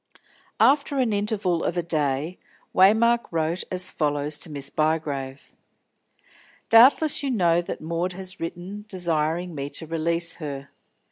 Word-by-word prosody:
After 280 0 +3
an 245 -5 +1
interval 200 -4 0
of - - -2
a 175 - 0
day 155 0 -1 0.3
Waymark 225 +5 +4
wrote 165 +1 -1
as 185 0 -2
follows 145 0 -1
to 160 - -4
Miss 140 -1 -3
Bygrave: 145 -4 -2 1.2
"Doubtless 265 +6 +6
you 280 - -2
know 175 -8 +2
that 175 - -6
Maud 170 +3 -2
has 185 0 -5
written 180 +5 -6
desiring 170 -2 -1
me 140 -1 -4
to 160 - -3
release 165 +1 -1
her. 140 -3 -6
170 Hz, 135 wpm, -24 LUFS, 155-195 Hz, 1.2 s, Doubtless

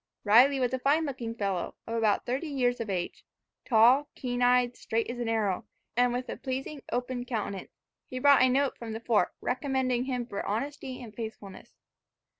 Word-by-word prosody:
Riley 250 +6 +6
was 250 -1 0
a 260 - 0
fine 295 +5 +2
looking 240 -5 -4
fellow, 195 -5 -2
of 230 - -5
about 220 -3 +1
thirty 265 +7 -2
years 250 -4 0
of 225 -2 -4
age 180 -3 -3 0.4
tall, 245 +5 +5
keen 245 -1 -3
eyed, 245 0 +4
straight 225 +1 -2
as 240 - -7
an 235 -2 -2
arrow, 210 -5 0 0.3
and 245 +1 +3
with 250 +1 -3
a - - -5
pleasing 270 +2 -4
open 245 0 -2
countenance. 215 -6 -5 0.3
He 255 - -6
brought 280 +1 +6
a 255 - +5
note 270 +1 +1
from 225 -2 -6
the 220 - -4
fort, 230 -2 +2
recommending 255 -1 0
him 250 -2 -2
for 200 -4 -5
honesty 255 +4 -4
and 220 -3 -10
faithfulness. 215 -4 -8
245 Hz, 185 wpm, -29 LUFS, 225-260 Hz, 0.4 s, Riley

